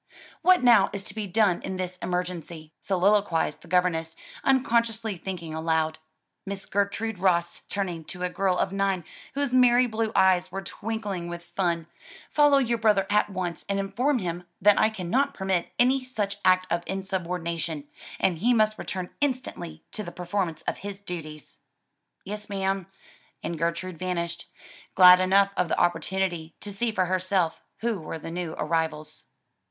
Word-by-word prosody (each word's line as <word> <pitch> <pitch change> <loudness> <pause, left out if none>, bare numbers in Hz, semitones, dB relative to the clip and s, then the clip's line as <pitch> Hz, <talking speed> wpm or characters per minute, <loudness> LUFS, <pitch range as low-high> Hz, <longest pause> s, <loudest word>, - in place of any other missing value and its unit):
"What 360 -2 +5
now 230 -5 +6
is 200 -1 -4
to 205 - -8
be 215 -1 -4
done 195 -2 +2
in 190 - -4
this 185 0 -4
emergency?" 175 -3 -4
soliloquized 195 -2 +2
the - - -15
governess, 165 -2 +1 0.3
unconsciously 230 -5 +2
thinking 170 -2 -6
aloud. 160 0 0 0.4
"Miss 195 0 -6
Gertrude 200 +1 -1
Ross," 175 -2 +1
turning 180 -5 -2
to 180 +2 -6
a - - +2
girl 185 0 +1
of 190 - 0
nine 195 -2 0 0.3
whose 280 -3 -1
merry 250 0 +6
blue 220 -1 -1
eyes 185 -1 +4
were 195 +1 -4
twinkling 205 -6 -4
with 175 0 -6
fun, 170 -3 0 0.5
"follow 290 -2 +5
your 240 -3 +1
brother 210 -3 +3
at 210 0 +3
once 180 -4 -4
and 200 - +1
inform 225 +9 +1
him 175 -4 -3 0.2
that 205 +2 +5
I 215 - +5
cannot 220 +8 0
permit 190 -3 -1
any 255 +2 +3
such 210 -6 -3
act 185 0 +4
of 170 0 +1
insubordination; 170 -5 -3 0.3
and 175 -4 +1
he 240 +6 +3
must 215 -1 +2
return 185 -1 -4
instantly 245 - -2
to - - -5
the - - -6
performance 180 -2 -3
of - - -3
his 200 0 -6
duties." 160 -6 -8 0.7
"Yes 210 +2 -6
ma'am," 195 -2 -1 0.6
and 170 - -3
Gertrude 170 +1 -2
vanished; 170 -2 -3 0.5
glad 180 -1 +9
enough 195 +2 +4
of 180 - +1
the - - 0
opportunity 175 -2 0
to 205 - -7
see 230 +3 0
for 190 -4 +1
herself 185 -2 0 0.2
who 230 -3 0
were 160 0 -6
the 165 +1 -7
new 170 -2 -4
arrivals. 160 -2 -2
190 Hz, 160 wpm, -26 LUFS, 175-210 Hz, 0.7 s, glad